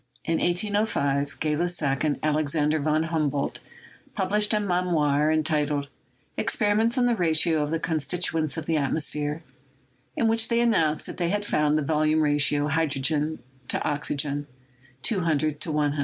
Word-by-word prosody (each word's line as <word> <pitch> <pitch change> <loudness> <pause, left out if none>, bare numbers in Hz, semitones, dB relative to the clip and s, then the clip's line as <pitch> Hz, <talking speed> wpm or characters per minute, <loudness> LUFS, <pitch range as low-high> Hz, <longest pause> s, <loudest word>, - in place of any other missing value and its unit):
In 165 - 0
1805, 175 -7 0
Gay 155 -1 0
Lussac 155 -5 0
and 150 -2 0
Alexander 155 0 +1
von 155 +2 +1
Humboldt 150 -4 -1 0.6
pub 190 0 -2
lished 210 0 +2
a 215 - +2
memoir 165 -6 +1
entitled 150 -2 0 0.5
"Experiments 220 +2 +1
on 250 - +3
the 245 - +3
Ratio 165 -3 +2
of 150 - -1
the 165 +1 -1
Constituents 160 -1 -1
of 160 - -4
the 160 0 0
Atmosphere," 150 +1 -2 0.7
in 230 - +1
which 225 0 +2
they 235 - +1
announced 165 -11 +2
that - - -6
they 175 -1 0
had 205 +2 -1
found 150 -4 +1
the 155 - 0
volume 155 +1 +1
ratio, 145 -1 +2
hydrogen: 150 -2 0 0.3
oxygen:: 145 0 -2 0.6
200: 155 -7 0
100. 150 -1 0
155 Hz, 140 wpm, -25 LUFS, 145-175 Hz, 0.7 s, on